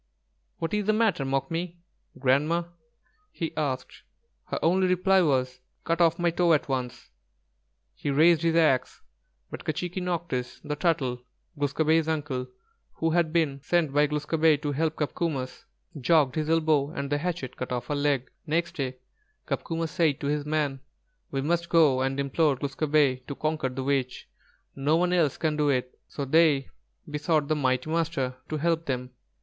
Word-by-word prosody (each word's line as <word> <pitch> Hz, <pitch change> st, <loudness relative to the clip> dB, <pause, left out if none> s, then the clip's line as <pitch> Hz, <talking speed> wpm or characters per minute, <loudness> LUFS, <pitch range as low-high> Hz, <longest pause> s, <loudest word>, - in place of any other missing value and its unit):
"What 165 Hz, +3 st, -3 dB
is 210 Hz, -1 st, 0 dB
the 215 Hz, -, +4 dB
matter, 215 Hz, -9 st, +2 dB
'Mookmee' 165 Hz, +6 st, -2 dB, 0.4 s
[Grandma]?" 145 Hz, +6 st, +2 dB, 0.7 s
he 165 Hz, -, -4 dB
asked. 135 Hz, -4 st, -3 dB, 0.4 s
Her -, -, -3 dB
only 185 Hz, +3 st, +3 dB
reply 185 Hz, +1 st, +3 dB
was: 130 Hz, -5 st, +1 dB, 0.2 s
"Cut 165 Hz, +1 st, 0 dB
off 165 Hz, -1 st, +4 dB
my 175 Hz, -1 st, +1 dB
toe 170 Hz, 0 st, +3 dB
at 150 Hz, -, +1 dB
once." 125 Hz, -, -4 dB, 0.8 s
He -, -, -4 dB
raised 160 Hz, +3 st, +5 dB
his 165 Hz, -1 st, +1 dB
axe, 145 Hz, -6 st, +2 dB, 0.5 s
but -, -, -7 dB
K'chīquīnocktsh, 170 Hz, -6 st, -3 dB
the 150 Hz, -, -3 dB
Turtle, 135 Hz, -7 st, 0 dB, 0.3 s
Glūs 145 Hz, -2 st, -2 dB
kābé's 160 Hz, 0 st, +3 dB
uncle, 145 Hz, -5 st, -2 dB, 0.5 s
who 165 Hz, 0 st, -1 dB
had 170 Hz, -1 st, +2 dB
been 155 Hz, -5 st, 0 dB
sent 160 Hz, -1 st, +1 dB
by 145 Hz, +1 st, +4 dB
Glūs 150 Hz, 0 st, -3 dB
kābé 160 Hz, -1 st, +3 dB
to 145 Hz, -, -1 dB
help 155 Hz, +2 st, 0 dB
Copcomus, 150 Hz, -, -3 dB, 0.3 s
jogged 145 Hz, -1 st, +3 dB
his 155 Hz, 0 st, -2 dB
elbow 155 Hz, -3 st, +2 dB
and 140 Hz, -3 st, -5 dB
the 145 Hz, -, +1 dB
hatchet 165 Hz, -6 st, -3 dB
cut 125 Hz, -, -5 dB
off 125 Hz, -1 st, -2 dB
her 145 Hz, -, -2 dB
leg. 140 Hz, -3 st, 0 dB, 0.2 s
Next 170 Hz, +3 st, -1 dB
day 130 Hz, -3 st, -3 dB, 0.5 s
Copcomus 165 Hz, -1 st, -3 dB
said 155 Hz, -5 st, +1 dB
to -, -, -3 dB
his 145 Hz, 0 st, -1 dB
men: 150 Hz, -3 st, 0 dB, 0.5 s
"We 135 Hz, -, -2 dB
must 170 Hz, +4 st, 0 dB
go 150 Hz, -6 st, +4 dB
and 135 Hz, +1 st, -1 dB
implore 140 Hz, +1 st, +2 dB
Glūs 140 Hz, 0 st, -4 dB
kābé 145 Hz, -4 st, +2 dB
to 140 Hz, -, -5 dB
conquer 155 Hz, -3 st, -1 dB
the 130 Hz, +1 st, -5 dB
witch. 135 Hz, -2 st, -1 dB, 0.5 s
No 145 Hz, +4 st, +2 dB
one 180 Hz, +1 st, +1 dB
else 160 Hz, -6 st, +2 dB
can 155 Hz, -2 st, 0 dB
do 150 Hz, -1 st, +1 dB
it." 125 Hz, -2 st, 0 dB
So 140 Hz, -, -5 dB
they 150 Hz, -1 st, +3 dB, 0.4 s
besought 150 Hz, 0 st, 0 dB
the 155 Hz, -, +2 dB
mighty 130 Hz, -2 st, 0 dB
Master 160 Hz, -6 st, -1 dB
to 155 Hz, -, -2 dB
help 165 Hz, +1 st, 0 dB
them. 125 Hz, -1 st, -3 dB
150 Hz, 165 wpm, -27 LUFS, 135-165 Hz, 0.8 s, raised